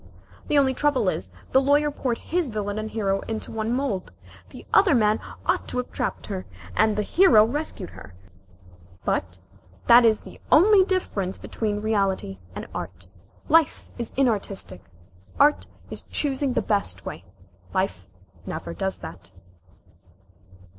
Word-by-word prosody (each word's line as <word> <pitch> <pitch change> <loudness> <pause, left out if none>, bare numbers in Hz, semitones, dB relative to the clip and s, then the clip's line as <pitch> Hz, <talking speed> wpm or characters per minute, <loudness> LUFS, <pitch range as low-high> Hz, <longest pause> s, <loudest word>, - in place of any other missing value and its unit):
The 295 - +2
only 270 -2 +4
trouble 260 -7 +2
is, 95 - -4 0.2
the 265 - +5
Lawyer 290 +2 +3
poured 250 -4 -2
his 345 -4 -1
villain 210 -1 -3
and 215 0 -4
hero 195 -3 0
into 220 -1 -4
one 220 0 -2
mould. 245 -8 -2 0.4
The - - -12
other 375 -8 +6
man 215 -2 +3 0.3
ought - - 0
to - - -4
have 250 - -3
trapped - - -3
her, 190 -3 -5 0.3
and 215 -1 +3
the 210 - +1
hero 235 - +6
rescued 245 - -4
her. 95 -1 -13 0.9
But 90 0 -1 0.5
that 240 +1 +8
is 220 -2 +3 0.3
only 405 +6 +7
the 375 - +4
difference 200 - -1
between 210 -2 -3
reality 195 - 0 0.2
and - - -5
art. 90 0 -7 0.4
Life 320 -1 +3
is 235 - -3
inartistic. 200 - 0 0.6
Art 295 +1 +4 0.2
is - - -2
only - - -24
choosing 275 -2 +1
the - - 0
best 205 -2 0
way. 85 - -6 0.5
Life 140 - -2 0.4
never 85 - -5
does 190 - -2
that." 85 -1 -9
220 Hz, 145 wpm, -25 LUFS, 195-275 Hz, 0.9 s, that